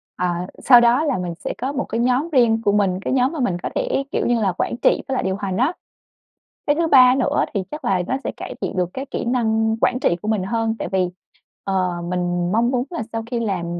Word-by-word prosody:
à, 180 0 -2 0.2
sau 245 -2 +8
đó 240 +5 +4
là 280 -9 0
mình 180 -1 -3
sẽ - - -4
có 260 +2 -2
một 280 -1 -2
cái 230 - -3
nhóm 255 +6 +1
riêng 235 -6 +3
của 205 - +2
mình, 195 -3 +1
cái - - -2
nhóm 260 +2 +2
mà 320 - -5
mình 220 -9 0
có - - -2
thể, - - 0
kiểu - - 0
như 240 -1 +1
là, 195 -3 +2
quản - - -1
trị - - +2
với 270 - -1
lại - - -1
điều 190 0 -1
hành 195 -2 -3
á. 265 +9 +2 0.9
Cái 290 - +3
thứ 330 +1 +1
ba 255 -3 +7
nữa 265 - +1
thì 200 -3 -1
chắc 300 +1 -7
là 185 -2 +1
nó 265 - 0
sẽ - - -2
cải - - -7
thiện - - -3
được 180 -1 0
cái 265 +1 -5
kỹ - - -3
năng 225 -2 +1
quản 255 - +2
trị 175 - +2
của - - -6
mình 215 -4 0
hơn. 225 +2 -1
Tại - - -3
vì, 185 -2 +1 0.5
ờ, 190 -2 0 0.2
mình 175 -1 -1
mong 230 +3 +2
muốn 250 -2 0
là 340 -9 -4
sau 225 0 -2
khi 240 - -1
làm 195 -7 -2
225 Hz, 255 wpm, -21 LUFS, 190-255 Hz, 0.9 s, sau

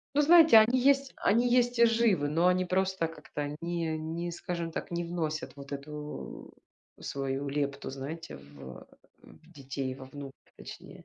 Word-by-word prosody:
Ну 295 - +5
знаете, 320 -5 +8
они 230 +4 +4
есть, 275 +1 +3
они 235 +4 +2
есть 245 0 +2
и 235 - +7
живы, 225 -10 +2
но 165 +4 +3
они 180 0 +2
просто, 185 -1 0
как-то, 150 -2 -6
ни 170 -1 -2
а, 160 - -1
не 165 +2 -4
скажем 170 -1 -4
так, - - -5
не 170 0 -2
вносят 160 -3 -3
вот 140 0 -11
эту 150 - -7 0.5
свою 135 0 -3
лепту, 140 0 -2
знаете, 145 +5 -7
в, 70 -2 -12
э, - - -13 0.4
в 165 +2 -18
детей, 135 -3 -5
во 130 0 -11
внуков, 140 0 -9 0.2
точнее. - - -11
165 Hz, 170 wpm, -29 LUFS, 140-190 Hz, 0.5 s, знаете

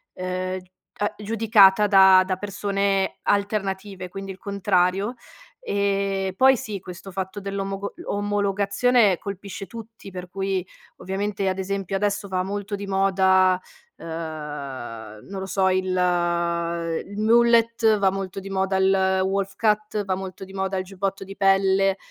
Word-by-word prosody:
ehm, 185 0 -3
g 180 0 -20 0.3
a 205 - -1
giudicata 210 -2 +5
da 190 -2 +7
da 185 0 -1
persone 200 -1 -1
alternative, 195 -2 -1
quindi 195 +1 -7
il 190 - -7
contrario. 195 +2 0 0.4
Ehm, 195 - -1
poi 265 +3 +6
sì, 215 -5 -5
questo 180 +1 -10
fatto 190 +2 -4
dell'omogo 195 0 -4
l 345 - -11
omologazione 205 +1 +2
colpisce 200 0 -7
tutti, 225 -2 -11
per 180 -1 -7
cui, 190 -1 -2 0.3
ovviamente, 195 +1 -2
ad 185 - -2
esempio, 195 0 -3
adesso 205 0 -1
va 185 -1 -1
molto 205 +1 -4
di 200 0 -6
moda, 190 -1 +3 0.4
uhm, - - -11 1.2
non 195 0 -6
lo 190 - -4
so, 190 0 +2
il 185 0 +1 1.2
il 200 +1 -9
mullet, 230 0 +4
va 195 -1 +3
molto 195 0 -4
di 195 0 -8
moda 190 0 0
il 190 0 +3
wolf 195 0 -1
cut, 210 -1 0
va 190 - 0
molto 190 +1 -6
di 190 - -14
moda 190 0 -2
il 185 - -1
giubbotto 195 +1 -4
di 195 +1 -10
pelle, 195 0 +3
195 Hz, 145 wpm, -24 LUFS, 190-205 Hz, 1.2 s, da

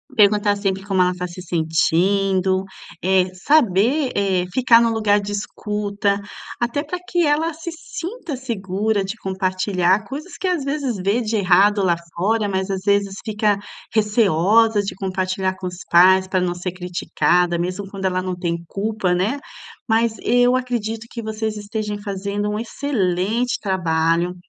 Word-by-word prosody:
Perguntar 205 -2 +4
sempre 195 -1 -2
como 195 -2 +1
ela 180 0 +2
tá 180 0 -4
se 175 +1 -9
sentindo, 185 +3 +1 0.4
eh, 185 0 +2
saber, 250 +4 +2
eh, 190 -3 +1
ficar 245 -3 +5
no 230 -1 +2
lugar 210 -2 +2
de 205 0 -5
escuta, 205 0 -2 0.4
até 245 +5 0
para 355 +4 -5
que 350 -1 0
ela 305 +3 +1
se 330 +1 -6
sinta 340 - -6
segura 210 -4 -1
de 195 +3 -4
compartilhar 190 -1 0
coisas 295 - -8
que, 375 - -1
às 355 -6 0
vezes, 275 -5 -2
vê 200 +6 0
de 220 0 -2
errado 200 +1 +4
lá 175 -2 +3 0.2
fora 210 +4 +1
mas, 190 0 -2
às 190 -1 -2
vezes, 200 -1 +2
fica 210 -1 +1 0.4
receosa 215 0 +3
de 195 - -4
compartilhar 185 0 -2
com 190 - -8
os 180 -1 -7
pais 185 +2 +6
para 185 0 0
não 180 -1 0
ser 175 0 -4
criticada, 180 -1 0
mesmo 185 +3 -3
quando 195 -1 -6
ela 185 -1 +1
não 185 -1 -3
tem 170 -1 -2
culpa, 200 -2 -1
né. 205 +11 0 0.5
Mas 225 0 +2
eu 245 +1 +4
acredito 230 -3 -3
que 230 -2 -6
vocês 220 0 -3
estejam 210 0 -4
fazendo 200 +1 -3
um 210 - -2
excelente 225 -2 -1
trabalho. 170 -2 0
200 Hz, 155 wpm, -21 LUFS, 185-225 Hz, 0.5 s, pais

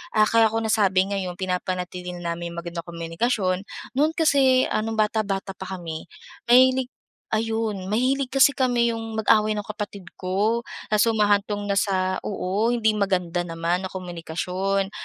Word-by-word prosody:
ah, 215 0 +6
kaya 225 0 +4
ko 225 - -2
nasabi 200 -4 +3
ngayon 185 -3 -3
pinapanatili 180 -1 -3
na 170 -1 -3
namin 170 0 -5
yung 170 0 -6
magandang 170 -1 -6
komunikasyon. 185 +3 -1 0.3
No'n 295 +4 +2
kasi, 270 -5 +4
ah, - - +1
nung 225 0 -3
bata-bata 205 -3 0
pa 190 0 -8
kami, 165 -2 -7 0.4
mahilig 255 +1 +5 0.4
ayun! 220 -3 -1
Mahilig 255 +6 +1
kasi 270 +1 +6
kami 245 -2 +2
yung 225 -1 -5
mag-away 215 0 +3
nung 210 - -3
kapatid 210 -2 -6 0.2
ko. 205 +5 0 0.3
Tapos 210 0 +4
humahantong 205 -2 +2
na 200 - +1
sa 185 -2 0
oo, 200 +3 0
hindi 220 -2 +2
maganda 185 -4 0
naman 170 +2 -1
na - - -16
komunikasyon. 185 +2 -3
200 Hz, 150 wpm, -24 LUFS, 185-225 Hz, 0.4 s, ah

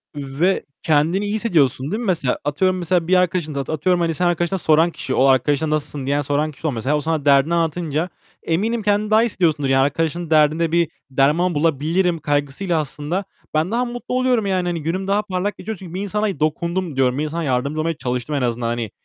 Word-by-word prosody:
Ve 145 +7 -1 0.2
kendini 160 +6 +2
iyi 205 - -2
hissediyorsun 150 - +1
değil 215 - -1
mi 240 - -4
mesela? 165 - 0
Atıyorum 185 +6 +1
mesela 175 -1 0
bir 185 - +4
arkadaşına, 175 -5 0
atıyorum 160 +5 0
hani 165 -1 +1
senin 175 +3 +1
arkadaşına 175 +2 0
soran, 160 +1 +3 0.2
o 130 - +4
arkadaşına 140 +3 +2
"Nasılsın?" 150 -2 -2
diyen 140 +2 +1
soran 145 +2 -1
kişi 150 +3 -5
ol - - +1
mesela. 130 +4 -1
O - - -2
sana 155 -1 -2
derdini 140 +3 +4
anlatınca, 165 0 -1 0.3
eminim 215 +7 0
kendini 210 +1 +1
daha 220 +1 +6
hissediyorsundur. 165 - +1
Yani 135 0 +4
arkadaşın 165 +4 -1
derdinde 155 +1 +3
bir 170 -2 +2 0.2
derman 150 +7 +2
bulabilirim 165 +4 +1
kaygısıyla 145 +4 -1
aslında 155 +5 -3 0.3
ben 155 +5 +1
daha 240 +2 +1
mutlu 245 +1 -5
oluyorum. 255 -4 +2
Yani 185 -2 0
hani 170 -2 -2
günüm 185 +5 -2
daha 200 +1 +2
parlak 200 0 -3
geçiyor. 220 +2 -5
Çünkü 180 -2 -10
"Bir 185 - -3
insana 205 0 -2
dokundum." 170 +2 -1
diyorum. 130 -1 +2
Bir 150 - 0
insana 160 +2 -3
yardımcı 140 +2 -1
olmaya 165 0 -1
çalıştım 125 +3 -3
en 140 - 0
azından. 120 -1 -1
Hani 115 -3 -3
165 Hz, 200 wpm, -20 LUFS, 145-185 Hz, 0.3 s, daha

